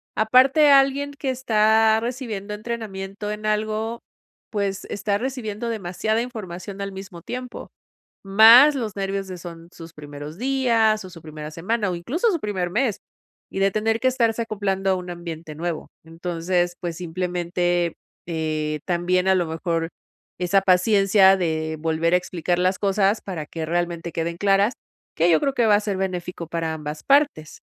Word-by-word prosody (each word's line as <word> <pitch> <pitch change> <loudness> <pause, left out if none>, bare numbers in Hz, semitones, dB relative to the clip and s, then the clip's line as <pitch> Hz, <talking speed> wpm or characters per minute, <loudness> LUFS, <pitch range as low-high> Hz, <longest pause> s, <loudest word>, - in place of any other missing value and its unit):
Aparte, 260 +6 +5
alguien 275 +1 +4
que 275 -1 -3
está 220 -3 +3
recibiendo 230 -4 -4
entrenamiento 210 -2 -5
en 210 0 -5
algo, 215 +2 -1 0.5
pues, 200 -2 -2
está 200 0 -1
recibiendo 235 -3 -4
demasiada 215 +1 -1
información 200 -5 -7
al 200 -1 -4
mismo 190 -3 -9
tiempo, 250 +3 -7 0.5
más 225 +9 +8
los 220 -6 -4
nervios 195 0 -2
de, 185 -1 -7
son 170 -1 -10
sus 165 0 -12
primeros 145 +2 -9
días, 230 -5 +2
o - - -9
su 170 -3 -13
primera 155 -1 -8
semana, 205 +6 -1
o 180 - -2
incluso 305 - 0
su 335 - -1
primer 190 -4 -2
mes, 220 +2 0 0.5
y 195 - -5
de 195 0 +3
tener 225 +2 0
que 260 - +4
estarse 235 -3 +1
acoplando 195 -3 -1
a 190 - +3
un 180 -1 -6
ambiente 165 -3 -7
nuevo. 170 0 -4
Entonces, 175 +1 -2
pues 170 -2 -4
simplemente, 175 0 -1 0.3
eh, 155 -2 -2
también 180 +1 +1
a 190 - +5
lo 175 -2 +1
mejor 165 0 -2 0.5
esa 185 +2 +3
paciencia 195 +1 +5
de 160 -2 -2
volver 165 +2 +1
a - - +6
explicar 175 -1 -2
las 185 +1 +1
cosas 200 +1 +2
para 170 -6 -5
que 160 +1 -5
realmente 170 0 -2
queden 170 +1 -3
claras, 200 +4 +3 0.4
que 170 +2 +3
yo 160 - +5
creo 275 - 0
que 240 -3 +2
va 210 - +6
a 205 - +3
ser 205 -2 -3
benéfico 180 -3 -4
para 165 -1 -2
ambas 150 0 -6
partes. 280 - +2
195 Hz, 160 wpm, -23 LUFS, 170-220 Hz, 0.5 s, más